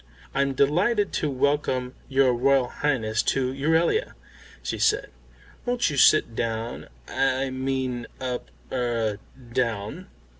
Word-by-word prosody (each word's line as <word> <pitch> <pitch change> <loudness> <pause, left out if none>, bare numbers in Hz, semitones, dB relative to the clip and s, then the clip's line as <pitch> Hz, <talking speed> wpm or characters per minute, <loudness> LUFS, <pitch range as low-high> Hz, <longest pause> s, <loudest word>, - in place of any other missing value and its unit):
"I'm 140 0 +1
delighted 185 - +2
to 150 - +1
welcome 130 -2 0 0.2
your 135 -2 +4
Royal 130 +1 +3
Highness 115 -7 0 0.2
to 130 -1 0
Euralia," 160 - +1 0.5
she - - -3
said. - - +2 0.5
"Won't 245 -8 +1
you 145 - -3
sit 130 -4 +5
down 115 0 -3 0.2
I 135 0 0
mean 130 -2 -2
up 125 - -4 0.2
er, 115 -4 -1 0.3
down." 115 -5 -2
130 Hz, 115 wpm, -25 LUFS, 120-140 Hz, 0.5 s, sit